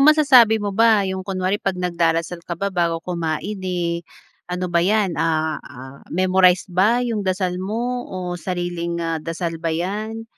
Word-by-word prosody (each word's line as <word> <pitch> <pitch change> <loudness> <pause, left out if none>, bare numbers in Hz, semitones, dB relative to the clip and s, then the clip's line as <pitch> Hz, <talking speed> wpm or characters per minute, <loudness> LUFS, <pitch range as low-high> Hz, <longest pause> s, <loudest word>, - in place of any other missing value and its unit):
masasabi 275 -7 +6
mo 205 -2 -3
ba 220 -1 +4
yung 190 0 -3
kunwari 185 +1 -2
pag 195 -2 -1
nagdarasal 170 -1 0
ka 170 0 -6
ba 200 +3 -2
bago 170 -2 +1
kumain, 175 +3 -3
eh, 175 -2 -2 0.5
ano 180 0 -3
ba 170 - +4
yan, 200 +1 +2
ah 160 -2 0
ah, 130 +1 -12
memorize 185 0 +3
ba 220 +7 +3
yung 230 -3 -1
dasal 185 -2 -1
mo, 240 +5 -3
o 180 -1 -5
sariling, 175 -2 -3
ah, 165 -1 -2
dasal 165 +1 -4
ba 165 - -1
yan? 210 +7 -3
180 Hz, 160 wpm, -21 LUFS, 170-205 Hz, 0.5 s, masasabi